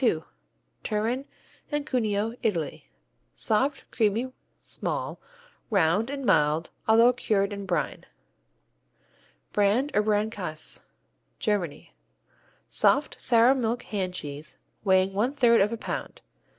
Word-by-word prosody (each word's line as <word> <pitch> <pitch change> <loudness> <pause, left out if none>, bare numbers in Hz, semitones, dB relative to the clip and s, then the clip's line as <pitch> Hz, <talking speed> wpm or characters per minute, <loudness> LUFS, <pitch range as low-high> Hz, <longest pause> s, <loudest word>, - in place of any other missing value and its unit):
II 165 -10 +2 0.6
Turin 230 +6 -1 0.5
and 295 -1 -1
Cuneo, 220 -5 0
Italy 170 -9 -2 0.5
Soft, 270 +6 0
creamy, 230 +3 0 0.3
small, - - -4 0.5
round 200 +2 +2
and 275 -1 -4
mild 150 -1 +2 0.2
although 230 +3 +6
cured 205 -4 0
in 200 -1 -6
brine. 170 -6 -2 1.5
Brand 215 +8 +2
or 210 - +4
Brandkäse 205 -7 -1 0.6
Germany 190 -8 -2 0.7
Soft, - - +2
sour 240 +1 +5
milk 240 -2 -1
hand 185 -3 -3
cheese, 145 -1 -6 0.3
weighing 190 -1 +3
one 235 +8 0
third 235 -5 +5
of 205 +3 +2
a 230 - -3
pound. - - -5
210 Hz, 110 wpm, -27 LUFS, 190-240 Hz, 1.5 s, although